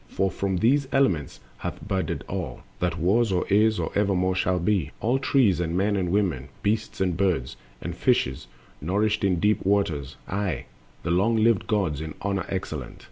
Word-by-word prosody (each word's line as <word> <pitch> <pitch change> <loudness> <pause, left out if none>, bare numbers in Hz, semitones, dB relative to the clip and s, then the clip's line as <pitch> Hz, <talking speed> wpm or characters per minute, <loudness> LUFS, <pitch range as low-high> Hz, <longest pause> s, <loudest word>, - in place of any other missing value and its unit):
For 95 -1 0
from 95 0 -1
these 135 +8 +3
elements 95 - +1 0.2
hath - - -6
budded 95 -1 -1
all - - -5 0.2
That 90 -1 0
was 100 +6 +2
or 90 -1 +1
is 105 +2 +4
or - - -2
evermore 95 -2 +2
shall 90 0 +1
be— 90 -4 +1
All 125 +4 +1
trees, 120 - +3
and 85 0 -1
men 100 +2 +2
and 90 -3 0
women, 85 -9 0
beasts 105 +1 -1
and 90 -3 +1
birds, 90 -8 0 0.3
And 85 0 -5
fishes 65 - +1 0.3
nourished 105 +7 0
in 95 -3 +2
deep 105 +4 +2
waters, 80 -9 0
aye, 100 -1 -2 0.4
The 85 - -1
long 100 +7 +3
lived 110 -2 +3
gods, 95 -9 0
in 80 -1 -6
honors 100 -1 -2
excellent. 80 -9 -4
95 Hz, 175 wpm, -25 LUFS, 85-105 Hz, 0.4 s, is